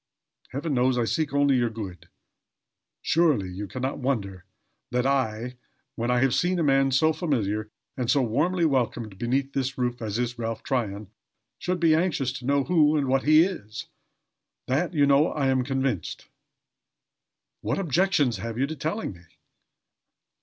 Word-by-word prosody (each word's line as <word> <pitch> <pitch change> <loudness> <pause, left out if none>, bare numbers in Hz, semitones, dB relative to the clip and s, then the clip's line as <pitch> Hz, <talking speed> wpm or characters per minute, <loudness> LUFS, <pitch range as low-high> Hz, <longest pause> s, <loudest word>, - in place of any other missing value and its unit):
Heaven 145 +3 -3
knows 125 0 +2
I 120 - +1
seek 155 +4 -1
only 140 -1 +3
your 120 -1 +1
good. 95 -6 -8 0.9
Surely, 155 - +2
you 100 +3 -5
can 130 +5 -6
not 135 +2 -2
wonder 100 -9 -2 0.4
that 125 +1 0
I, 125 -2 -1 0.4
when 120 +1 -3
I 125 0 +2
have 135 -2 +3
seen 180 +1 +1
a 170 - +1
man 135 -1 +3
so 155 +4 +3
familiar 110 - -1 0.3
and 125 -3 -2
so 140 0 +3
warmly 165 +10 +1
welcomed 120 -7 -1
beneath 135 +3 -1
this 135 -1 -2
roof 125 -1 -2
as 110 -1 -3
is 120 0 -2
Ralph 115 -1 -3
Tryon, 105 -7 -2 0.5
should 180 0 -2
be 165 -2 +4
anxious 155 -6 +1
to 125 - -11
know 140 0 +2
who 155 -2 +3
and 140 -3 0
what 135 0 +1
he 155 +2 +7
is. 110 - -5 0.8
That, 165 +7 -1
you 145 -2 +4
know, 140 +3 +3
I 140 -3 0
am 130 -1 +2
convinced. 130 - -2 1.3
What - - -1
objections 165 - +1
have 115 +3 -5
you 135 - +2
to 160 +3 -5
telling 160 - -3
me?" 85 - -16
130 Hz, 165 wpm, -26 LUFS, 115-150 Hz, 1.3 s, he